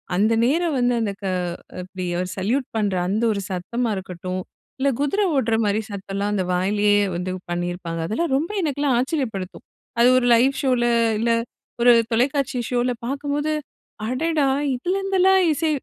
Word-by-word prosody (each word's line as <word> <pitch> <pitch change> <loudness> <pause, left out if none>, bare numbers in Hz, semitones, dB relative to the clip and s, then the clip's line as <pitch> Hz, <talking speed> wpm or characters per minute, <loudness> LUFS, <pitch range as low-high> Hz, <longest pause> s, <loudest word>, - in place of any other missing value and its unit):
அந்த 215 +4 +3
நேரம் 320 +4 +1
வந்து 245 0 +2
அந்த 215 -3 0
க - - -3 0.6
இப்டி 185 0 -6 0.3
சல்யூட் 235 +8 -1
பண்ற 205 -3 0
அந்த 210 +5 0
ஒரு 200 - -2
சத்தமா 230 +7 -2
இருக்கட்டும். 185 -1 -5 0.4
இல்ல 275 +1 +2
குதிர 290 +9 +1
ஓடுற 230 -4 +2
மாரி 205 +1 +1
சத்தம் 195 -1 -7
எல்லாம் 205 +1 -1
அந்த 190 -2 0
வாயிலயே 205 +3 +2 0.2
வந்து 180 +1 -3 0.2
பண்ணியிருப்பாங்க. 175 -1 -3
அதெல்லாம் 265 - -1
ரொம்ப 325 +7 -2
எனக்கெல்லாம் 285 -4 0
ஆச்சரியப்படுத்தும். 245 - -3 0.3
அது 245 +1 +6
ஒரு 255 - +2
லைவ் 255 +4 +4
ஷோல 250 -3 +2 0.3
இல்ல 230 +1 +1 0.5
ஒரு 245 - +7 0.2
தொலைக்காட்சி 260 +2 +1
ஷோல 245 0 +1
பாக்கும்போது 285 +3 -2 0.5
அடடா! 300 +5 0 0.3
இதுலருந்துலாம் 380 +5 +2
இசை 310 +2 0
240 Hz, 145 wpm, -22 LUFS, 200-285 Hz, 0.6 s, ஒரு